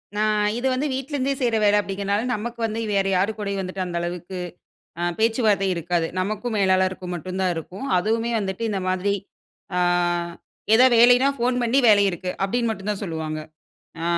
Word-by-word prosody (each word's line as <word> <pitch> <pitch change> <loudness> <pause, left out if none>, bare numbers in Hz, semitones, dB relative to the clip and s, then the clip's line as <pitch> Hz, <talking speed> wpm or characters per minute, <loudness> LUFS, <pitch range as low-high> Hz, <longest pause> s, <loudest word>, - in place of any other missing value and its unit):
நான் 210 0 +2
இது 250 +2 -1
வந்து 275 +4 -1
வீட்லருந்தே 270 +1 -2
செய்ற 240 -4 +1
வேல 205 0 +5
அப்டிங்றதுனால 200 +1 -2
நமக்கு 235 +3 -6
வந்து 220 0 -3
வேற 195 -1 +1
யாரு 190 +4 +2
கூடயும் 200 -2 -3
வந்துட்டு, 185 0 -4
அந்த 175 -1 -5
அளவுக்கு 175 +1 -5 0.6
அ - - -2 0.2
பேச்சுவார்த்த 220 -3 +2
இருக்காது. 170 0 -1
நமக்கும் 215 +5 -2
மேலாளருக்கு 185 -1 +1
மட்டும் 185 +3 -5
தான் 185 -1 +1
இருக்கும். 180 - -7
அதுவுமே 225 +5 0
வந்துட்டு 195 +1 -4
இந்த 195 -2 -2
மாதிரி. 185 +2 0 0.6
ஆ - - +2 1.0
ஏதாவது 250 +1 +6
வேலைன்னா 245 +3 +6
ஃபோன் 245 +1 +1
பண்ணி 240 +3 +2
வேலை 205 -2 +6
இருக்கு. 180 +1 -4
அப்டின்னு 235 +4 0
மட்டும் 210 -1 -3
தான் 205 0 -3
சொல்லுவாங்க. 160 -3 -4 0.6
ஆ - - -2
205 Hz, 165 wpm, -23 LUFS, 185-230 Hz, 1.0 s, ஏதாவது